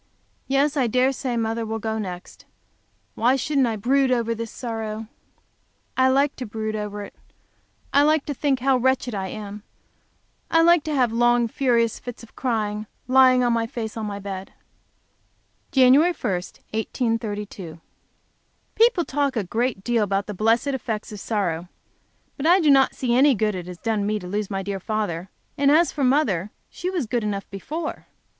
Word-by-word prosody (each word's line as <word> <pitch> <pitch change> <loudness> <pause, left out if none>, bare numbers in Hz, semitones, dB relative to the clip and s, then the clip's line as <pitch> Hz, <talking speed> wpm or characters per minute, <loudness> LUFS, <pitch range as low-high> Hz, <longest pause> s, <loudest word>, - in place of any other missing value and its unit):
Yes, 275 +2 +2
I 265 -4 +2
dare 255 +3 +3
say 255 -2 -3
mother 225 0 -1
will 220 0 -3
go 220 0 -3
next. 180 -4 -7 0.7
Why 245 +4 +3
shouldn't 270 0 +1
I 225 - -1
brood 260 +5 +2
over 230 -2 +1
this 230 0 -5
sorrow? 225 -2 -5 0.9
I 260 0 +4
like 275 +2 +2
to 255 - -5
brood 215 0 -4
over 210 -1 -4
it; - - -10 0.8
I 285 - +6
like 305 0 +3
to 290 - -3
think 275 -2 0
how 265 0 +3
wretched 255 -1 +1
I 190 -2 -3
am; 210 +1 -7 0.9
I 330 0 +4
like 340 -2 +5
to 305 -1 -1
have 250 -4 +2
long, 240 0 +3
furious 235 -2 +1
fits 245 -1 -8
of 230 - -16
crying, 215 -4 -2 0.2
lying 255 -1 +5
on 240 -1 +2
my 230 -1 0
face 225 -2 -5
on 220 -2 -3
the 200 -1 -5
bed. 195 -1 -7 1.2
Jan. 260 -1 +6
I, 350 +2 +2
1832. 210 -2 -3 0.9
People 450 -7 +3
talk 280 -1 0
a 220 - 0
great 225 +1 -2
deal 235 -1 +1
about 200 0 0
the 210 - -5
blessed 225 +7 +2
effects 230 -6 -3
of 210 - -7
sorrow. 180 -6 -2 0.7
But 295 +2 -1
I 360 +3 +6
do 310 -5 +4
not 270 -1 +4
see 245 -2 -1
any 265 +2 +5
good 210 0 0
it 180 -2 -6
has 180 -1 -8
done 215 -1 -1
me 215 0 0
to 190 - -8
lose 205 +2 -3
my 195 -1 -3
dear 195 0 -3
father, 195 -4 -3 0.3
and 280 0 +4
as 320 +4 +4
to 285 - -2
mother 250 - +2 0.2
she 360 - -4
was 355 -8 -1
good 230 +1 -1
enough 200 -2 -3
before. 305 - -5
230 Hz, 175 wpm, -23 LUFS, 210-265 Hz, 1.2 s, I